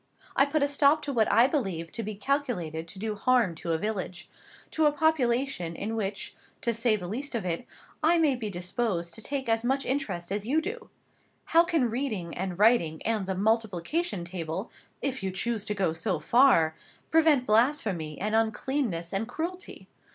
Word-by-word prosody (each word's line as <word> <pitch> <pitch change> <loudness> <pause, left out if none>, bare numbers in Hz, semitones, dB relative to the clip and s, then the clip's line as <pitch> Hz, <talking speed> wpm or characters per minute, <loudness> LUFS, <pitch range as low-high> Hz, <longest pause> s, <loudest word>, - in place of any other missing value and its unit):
I 275 - +4
put 300 0 +1
a - - +3
stop 285 +1 +3
to 285 - -3
what 225 -3 +2
I 230 +4 +6
believed 195 - -2
to 230 - -3
be 215 -1 -5
calculated 200 - -2
to 190 - -10
do 215 +2 -2
harm 235 -3 +2
to 165 +1 -4
a 165 - +2
village, 185 -3 -4 0.4
to 315 -1 +3
a - - +4
population 270 - +1
in 220 +5 -3
which, 200 -2 -3 0.3
to 235 - +1
say 230 0 +2
the 180 -4 -5
least 260 +7 -4
of 220 -5 -2
it, 175 +7 -2 0.3
I 330 +3 +4
may 310 -4 +3
be 225 -4 -4
disposed 175 -1 -2
to 225 - -6
take 270 +2 -3
as 225 0 +1
much 270 +3 0
interest 200 -11 -2
as 205 0 -1
you 275 +8 +2
can 400 +7 -3
do. 475 -1 -14 0.6
How 330 +1 +5
can 320 -9 +1
reading, 220 -9 -3
and 185 -1 -3
writing, 200 -8 +3
and 215 -4 0
the 190 - -1
multiplication 220 - 0
table 170 +2 -4 0.3
(if 265 -3 -1
you 190 - -1
choose 215 +3 -2
to 210 - -2
go 190 -5 +1
so 165 +1 -1
far) 165 - +4 0.4
prevent 315 -5 +4
blasphemy, 215 - +1
and 210 +3 -2
uncleanness, 220 -5 0
and 200 +3 -1
cruelty? 340 +8 -6
225 Hz, 190 wpm, -28 LUFS, 185-275 Hz, 0.6 s, I